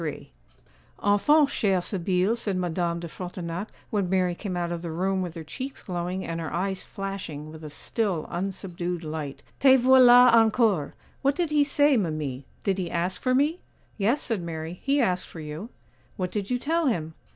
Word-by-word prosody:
'Enfin, 285 +10 +5
chère 195 -9 +1
Sibylle,' 185 +3 +1
said 205 -5 -1
Madame 175 -1 -1
de 170 - -6
Frontignac 175 +2 -5 0.2
when 200 -5 0
Mary 185 -1 +2
came 185 0 -4
out 175 -1 -2
of 170 -1 -3
the 170 - -5
room 190 +4 0
with 175 -2 -4
her 165 - -6
cheeks 260 - -7
glowing 180 +1 -3
and 165 0 -3
her 160 - -4
eyes 190 +2 -1
flashing 185 -7 -6
with 160 0 -11
a 155 - -6
still 185 +2 -2
unsubdued 180 -1 -3
light. 155 -3 -5 0.2
'Te 265 -1 +7
voilà 250 -1 +7
encore! 220 - +3 0.3
What 275 0 +2
did 345 -3 -1
he 295 -1 +4
say, 285 -1 +4
mimi? 150 - -2 0.2
did 195 -1 0
he 175 -2 -2
ask 175 +3 -1
for 255 0 +2
me?' 300 +6 +2 0.4
'Yes,' 230 +9 +2
said 225 -6 -1
Mary, 165 +1 -5
'he 280 +1 +2
asked 185 -8 +1
for 165 - -10
you.' 155 +8 -6 0.5
'What 180 -2 -2
did 200 -2 -3
you 250 - +1
tell 325 +5 0
him? 160 -10 -1
185 Hz, 180 wpm, -26 LUFS, 170-230 Hz, 0.5 s, Te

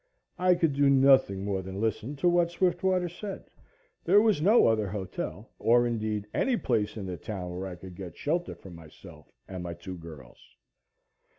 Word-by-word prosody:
I 180 0 +4
could 165 -4 +1
do 140 0 +3
nothing 135 -8 +4
more 100 -2 -1
than 95 +1 -7
listen 110 +5 -2
to 160 +6 0
what 175 -1 +3
Swiftwater 180 +1 +1
said. 190 +3 -7 0.6
There 205 - +5
was 210 -7 +2
no 210 +8 +5
other 110 -2 +2
hotel, 95 -2 -6
or 120 +1 +4
indeed 110 -3 -2
any 255 -3 +1
place 110 - -1
in 100 - -5
the 90 -2 -5
town 90 0 -6
where 95 +2 -4
I 90 - -7
could 95 +1 -11
get 90 -2 -9
shelter 175 +4 -2
for 95 - -13
myself 80 -2 -14 0.2
and 95 -1 -6
my 85 -1 -5
two 90 +1 -8
girls. 80 -7 -12
110 Hz, 180 wpm, -28 LUFS, -, 0.6 s, There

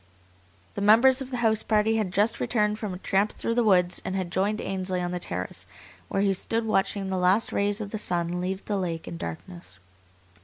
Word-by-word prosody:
The 200 - -4
members 240 +6 +6
of 265 - -6
the 250 - -3
house 220 -1 +3
party 220 +1 +2
had 210 -4 -1
just 205 +4 +1
returned 210 -2 0
from 210 -3 -4
a 180 - -5
tramp 195 +3 0
through 230 - -2
the 240 0 +2
woods 180 -4 +3
and 190 - -3
had 185 -2 -3
joined 200 +4 0
Ainsley 185 -1 -2
on 175 0 -2
the 180 - -3
terrace, - - -5 0.4
where 195 0 0
he 200 -1 +3
stood 225 +4 -2
watching 195 -2 0
the 190 - 0
last 185 +5 +2
rays 205 +1 0
of 205 -2 -6
the 215 - -3
sun 175 -2 -1
leave 190 +2 -3
the 205 - -1
lake 170 -4 -3
in 170 - -6
darkness. 165 - -8
195 Hz, 215 wpm, -26 LUFS, 180-215 Hz, 0.4 s, members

